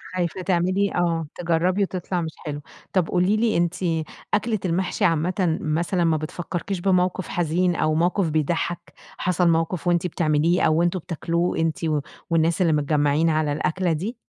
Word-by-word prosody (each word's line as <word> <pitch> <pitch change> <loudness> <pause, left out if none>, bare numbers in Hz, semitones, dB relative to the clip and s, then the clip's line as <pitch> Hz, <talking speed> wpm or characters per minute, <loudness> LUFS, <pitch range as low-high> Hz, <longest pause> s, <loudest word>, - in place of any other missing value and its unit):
خايفة 180 0 -2
تعملي 185 +2 +1
آه، 170 -2 0
تجرّبي 175 +3 +1
وتطلع 180 -1 -2
مش 160 -1 -4
حلو. 145 -1 -4 0.3
طب 185 -4 +2
قولي 185 +4 +2
لي 225 0 +2
أنتِ، 170 +1 +1 0.6
أكلة 215 0 +1
المحشي 180 +1 0
عامةً 170 +1 +1
مثلًا 170 +3 0
ما 160 -2 +2
بتفكركيش 175 +4 -4
بموقف 185 0 +1
حزين 175 +1 0
أو 155 -1 +1
موقف 175 +2 +1
بيضحك؟ 160 +2 -2 0.2
حصل 180 -1 +1
موقف 165 0 0
وأنتِ 175 0 +2
بتعمليه 160 +1 +1
أو 160 +1 +3
أنتم 175 +1 +1
بتاكلوه، 170 +1 -2
أنتِ 160 -1 0 0.5
والناس 165 +2 +2
اللي 165 -3 +3
متجمعين 150 +2 +2
على 155 -1 +1
الأكلة 170 +4 0
دي؟ 200 +10 -3
170 Hz, 150 wpm, -23 LUFS, 160-185 Hz, 0.6 s, أو